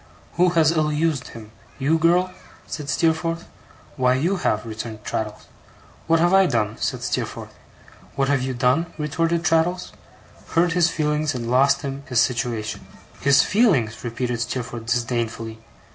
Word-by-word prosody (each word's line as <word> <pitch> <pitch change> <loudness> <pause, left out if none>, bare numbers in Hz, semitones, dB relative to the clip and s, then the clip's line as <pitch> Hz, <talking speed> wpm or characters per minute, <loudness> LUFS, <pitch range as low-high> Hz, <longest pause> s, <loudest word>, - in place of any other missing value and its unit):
'Who 180 +1 +3
has 160 -1 +5
ill 155 -2 +1
used 150 -3 0
him, 110 -2 -11 0.3
you 150 +4 +1
girl?' 175 +3 +3 0.3
said 145 -2 -6
Steerforth. 165 +1 0 0.5
'Why, 125 -1 +3
you 170 +9 0
have,' 110 -10 0
returned 110 -1 -7
Traddles. 105 0 -4 0.6
'What 165 0 +4
have 175 +2 +3
I 195 -1 +6
done?' 110 -6 -1
said - - -2
Steerforth. - - -3 0.6
'What 135 0 +1
have 140 -1 +2
you 130 0 -2
done?' 130 +7 +2
retorted 165 +2 0
Traddles. 170 +3 +1 0.6
'Hurt 170 0 +3
his 175 -1 +3
feelings, 150 -2 0
and 120 -1 -3
lost 135 +4 +3
him 135 0 -4
his 125 -3 +1
situation.' 115 -3 -1 0.3
'His 140 0 +5
feelings?' 160 - +2
repeated 120 0 -2
Steerforth 120 -1 -4
disdainfully. 115 -2 -2
140 Hz, 145 wpm, -22 LUFS, 120-165 Hz, 0.6 s, I